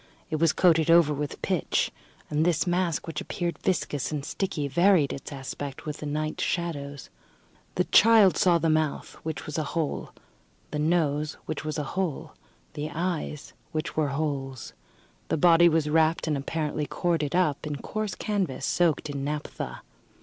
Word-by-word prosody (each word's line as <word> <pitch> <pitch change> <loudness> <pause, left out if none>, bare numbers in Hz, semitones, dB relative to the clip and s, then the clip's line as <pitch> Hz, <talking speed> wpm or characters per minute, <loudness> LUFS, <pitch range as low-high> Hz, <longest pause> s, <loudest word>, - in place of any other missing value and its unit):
It 155 - +1
was 165 0 +4
coated 165 -3 +3
over 165 -3 +6
with 145 0 -5
pitch; - - 0 0.4
and 150 +1 +1
this 170 -2 +2
mask, 175 -3 0
which 160 -2 -4
appeared 175 -2 -3
viscous 150 -7 -1
and 145 -2 -3
sticky, 180 -7 -2
varied 170 0 +4
its 140 - -8
aspect 135 0 -6
with 150 -1 -4
the 150 - -6
night 155 +1 -2
shadows. 145 -5 -3 0.6
The - - +2
child 215 -6 +6
saw 175 +1 +4
the 165 0 0
mouth, 155 -2 0
which 160 -1 -5
was 155 +1 -3
a - - 0
hole; 155 -3 -2 0.6
the 150 - -2
nose, 155 -2 +1
which 155 - -4
was 155 +1 -3
a 150 - -1
hole; 185 -6 -2 0.4
the 150 +1 -4
eyes, 165 -3 -3 0.2
which 155 +1 -3
were 155 -2 +2
holes. 140 -3 -3 0.5
The - - 0
body 170 +2 +6
was 160 -2 +1
wrapped, 160 +1 +2
and 155 -2 0
apparently 150 +1 -2
corded 165 -3 0
up, 155 -5 +1
in 150 - -3
coarse 215 +8 -4
canvas, 190 -11 -2
soaked 170 -4 +1
in 140 -2 -4
naphtha. 150 +1 -4
155 Hz, 165 wpm, -27 LUFS, 145-170 Hz, 0.6 s, over